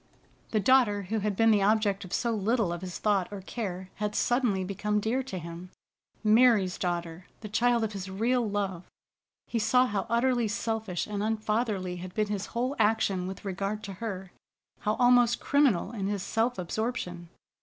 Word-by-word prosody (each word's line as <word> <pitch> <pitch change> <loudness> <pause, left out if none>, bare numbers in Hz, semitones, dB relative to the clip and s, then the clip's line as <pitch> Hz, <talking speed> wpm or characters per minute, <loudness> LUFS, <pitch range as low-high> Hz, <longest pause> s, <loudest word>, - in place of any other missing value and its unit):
The 215 - +1
daughter 210 -3 +4
who 220 +4 -2
had 210 -1 -1
been 225 +2 +4
the 210 -2 +4
object 205 -1 +2
of 185 - -10
so 235 - 0
little 215 -3 +1
of 175 - -6
his 180 -2 -5
thought 200 -4 +1
or 205 - -5
care 190 -3 -5
had 210 0 -2
suddenly 240 -6 +1
become 205 +2 -1
dear 225 +5 0
to 260 -7 -6
him. 170 +1 -8 0.5
Mary's 215 -4 +4
daughter, 175 -1 -3
the 215 - -6
child 235 +2 +2
of 215 -1 -2
his 195 -1 -6
real 235 +6 +1
love! 195 -4 -2 0.6
He 235 - -2
saw 250 +4 +4
how 205 -4 -2
utterly 240 0 +2
selfish 215 -3 -2
and 205 -1 -4
unfatherly 215 -4 -1
had 180 +1 -8
been 215 -1 0
his 205 0 -2
whole 255 +4 0
action 210 -4 +2
with 190 +2 -8
regard 200 +2 -3
to 195 - -6
her; 190 -5 -5 0.5
how 210 +1 0
almost 245 -1 +4
criminal 270 -10 +2
in 200 -5 -3
his 200 -2 -2
self 230 +4 0
absorption. 180 -2 -3
210 Hz, 175 wpm, -28 LUFS, 190-230 Hz, 0.6 s, daughter